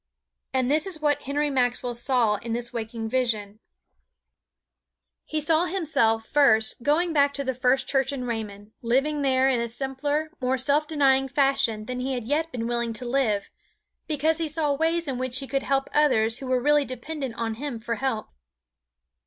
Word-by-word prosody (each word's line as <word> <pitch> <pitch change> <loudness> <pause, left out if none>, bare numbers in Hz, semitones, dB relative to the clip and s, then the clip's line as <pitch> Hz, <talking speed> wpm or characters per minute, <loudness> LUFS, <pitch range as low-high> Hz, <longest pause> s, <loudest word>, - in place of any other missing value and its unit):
And 260 0 +1
this 310 +5 +2
is 360 -5 -3
what 290 -1 +1
Henry 290 +2 -1
Maxwell 245 -2 0
saw 240 -3 +2
in 230 +2 -5
this 240 +1 -3
waking 225 -1 -4
vision: 220 -4 -1 1.7
He 310 - -2
saw 315 +3 +2
himself, 300 -12 +1
first, 225 -6 +3
going 315 +6 +1
back 285 -1 +3
to 280 - -2
the 260 -1 -1
First 255 +1 +1
Church 270 0 +1
in 260 -3 -4
Raymond, 215 -3 -5
living 275 +5 +1
there 265 -1 +3
in 255 -3 +2
a 235 - -3
simpler, 285 +5 -2
more 255 +1 +1
self 285 +4 +1
denying 270 -3 +3
fashion 270 -5 +1
than 250 +1 -4
he 260 +1 -2
had 245 - -4
yet 310 +6 -1
been 235 -4 -4
willing 235 -1 -1
to 235 +3 -3
live, 240 -5 0 0.6
because 310 +1 +1
he 325 - 0
saw 300 -1 0
ways 325 +3 0
in 260 -2 -3
which 255 0 -2
he 270 - -4
could 275 0 -1
help 270 0 0
others 240 -7 +3
who 270 - -7
were 255 0 +2
really 295 +3 +3
dependent 265 0 -5
on 225 -1 -2
him 285 -5 -3
for 230 0 -3
help. 260 -5 -2
265 Hz, 180 wpm, -25 LUFS, 235-290 Hz, 1.7 s, first